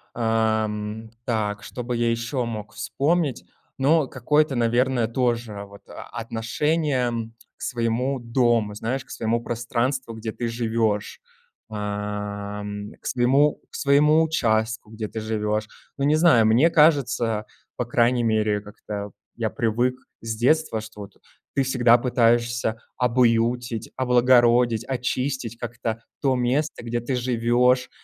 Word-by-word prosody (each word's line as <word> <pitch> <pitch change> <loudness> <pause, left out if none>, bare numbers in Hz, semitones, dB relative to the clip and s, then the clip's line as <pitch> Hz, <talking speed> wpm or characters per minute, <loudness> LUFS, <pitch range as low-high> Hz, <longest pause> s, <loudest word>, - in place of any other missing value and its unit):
Ам, 110 -1 -1 0.2
так 105 -4 -1
что 125 +3 -6
бы 120 0 -2
я 120 0 +1
ещё 120 +2 -2
мог 110 -2 -6
вспомнить, 150 -1 -1 0.3
но 150 +1 +3
какое-то, 150 +3 +1
наверное, 120 0 +2
тоже 115 -4 -1
вот 100 0 -15
а - - -10
отношение 125 +4 -1 0.5
к - - -22
своему 125 +3 -1
дому, 115 -3 +1
знаешь, 125 +5 -3
к - - -28
своему 115 +1 -1
пространству, 120 +1 -2
где 110 0 -5
ты 120 +1 -4
живёшь, 115 - -1 0.5
ам, 105 0 -4
к - - -42
к - - -21
своему 135 +4 +3
к - - -11
своему 150 +3 +4
участку, 110 -7 0
где 110 -1 -5
ты 110 - -6
живёшь. 110 0 -1 0.3
Ну, 140 - 0
не 150 - +4
знаю, 155 -9 +5
мне 120 +10 +5
кажется, 130 -9 +3 0.3
по 125 - -1
крайней 120 +1 +2
мере, 110 -2 +1
как-то 105 0 -7 0.2
я 115 -2 -1
привык 120 0 0 0.3
с 115 -1 -3
детства, 130 -1 +2
что 110 -1 -10
вот 100 -1 -10 0.4
ты 135 - +3
всегда 120 -2 +4
пытаешься 120 -2 +1 0.2
обуютить, 120 -1 +1
облагородить, 120 -2 +4
очистить 125 -2 -2
как-то 115 -1 -4 0.2
то 135 -2 +2
место, 125 +3 -1
где 120 0 -1
ты 125 +3 -2
живёшь. 125 +1 +2
120 Hz, 135 wpm, -24 LUFS, 110-130 Hz, 0.5 s, знаю